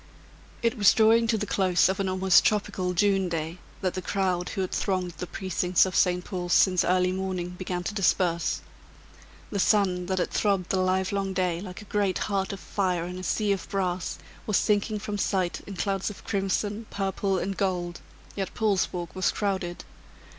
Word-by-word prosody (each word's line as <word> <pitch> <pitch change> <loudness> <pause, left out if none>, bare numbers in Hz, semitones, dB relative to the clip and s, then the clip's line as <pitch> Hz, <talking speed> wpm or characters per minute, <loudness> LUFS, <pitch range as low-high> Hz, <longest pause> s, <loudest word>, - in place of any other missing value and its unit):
It 230 0 +1
was 205 - +6
drawing 225 +1 +5
to 225 -1 +2
the 210 - -2
close 185 -4 +3
of 190 +1 -1
an 195 -1 0
almost 185 0 +4
tropical 190 -3 0
June 195 -1 +2
day, 165 +1 -3 0.2
that 185 -2 0
the 185 - -3
crowd 185 -2 -1
who 195 - -3
had 185 - -2
thronged 185 -3 -1
the 180 - -4
precincts 185 -1 +1
of 185 - -4
St. 180 -1 +2
Paul's 180 -3 -2
since 185 -2 +5
early 180 0 +2
morning, 185 -2 -3
began 180 -1 -4
to 195 - -3
disperse. 180 -4 +1 0.9
The 200 - -2
sun, 185 -3 +2
that 190 0 -1
had 180 - 0
throbbed 195 -4 +1
the 190 - +2
livelong 190 +1 0
day 180 -2 0
like 185 +1 -8
a - - -15
great 200 -3 0
heart 195 -2 -1
of 195 - -6
fire 180 -4 -1
in 180 +1 -6
a - - -7
sea 210 +2 0
of 195 - -2
brass, 185 -3 -2 0.3
was 210 - +3
sinking 210 0 +1
from 205 0 -4
sight 185 -4 0
in 200 - -6
clouds 195 +2 -1
of 210 - -10
crimson, 205 +2 -1
purple 195 0 -1
and 195 +2 -2
gold, 175 -3 -2 0.3
yet 195 -2 -4
Paul's 210 -4 +1
Walk 175 -3 -5
was 185 -1 +2
crowded. 190 -4 -2
190 Hz, 190 wpm, -27 LUFS, 180-200 Hz, 0.9 s, was